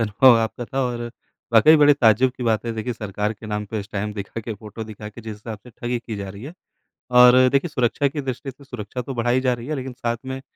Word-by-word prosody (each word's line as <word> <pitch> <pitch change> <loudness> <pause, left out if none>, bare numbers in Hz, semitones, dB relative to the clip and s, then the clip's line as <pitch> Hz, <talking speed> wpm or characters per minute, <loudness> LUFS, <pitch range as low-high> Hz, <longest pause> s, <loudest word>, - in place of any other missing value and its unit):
अनुभव 115 +3 +5
आपका 115 +2 -2
था 135 +3 -3
और 120 -1 -3 0.5
वाक़ई 115 +8 +7
बड़े 145 -1 +6
ताज्जुब 125 0 +4
की - - -6
बात 115 -2 +1
है, 115 - -1
देखिए, 110 +2 -3
सरकार 105 -1 -3
के 110 +1 -12
नाम 105 -1 -3
पे 110 - -2
इस 100 - -10
टाइम 105 +1 -2
दिखा 100 +2 -5
के, 110 0 -5
फ़ोटो 105 +2 -8
दिखा 105 -1 -9
के 105 +3 -11
जिस 110 -1 -7
हिसाब 110 +1 -8
से - - -11
ठगी 120 +1 -3
की 115 -2 -7
जा 100 -1 -5
रही 100 +2 -11
है। 150 - -8 0.6
और 125 +1 +7
देखिए, 140 +6 +1
सुरक्षा 140 0 +1
की 145 +2 -4
दृष्टि 135 0 -5
से 140 - -17
सुरक्षा 125 -1 -6
तो 135 +2 -6
बढ़ाई 120 +2 +1
जा 130 -1 +1
रही 120 0 -8
है, 155 - -2
लेकिन 130 -1 -5
साथ 120 -1 -2
में 130 0 -4
120 Hz, 255 wpm, -22 LUFS, 110-130 Hz, 0.6 s, वाक़ई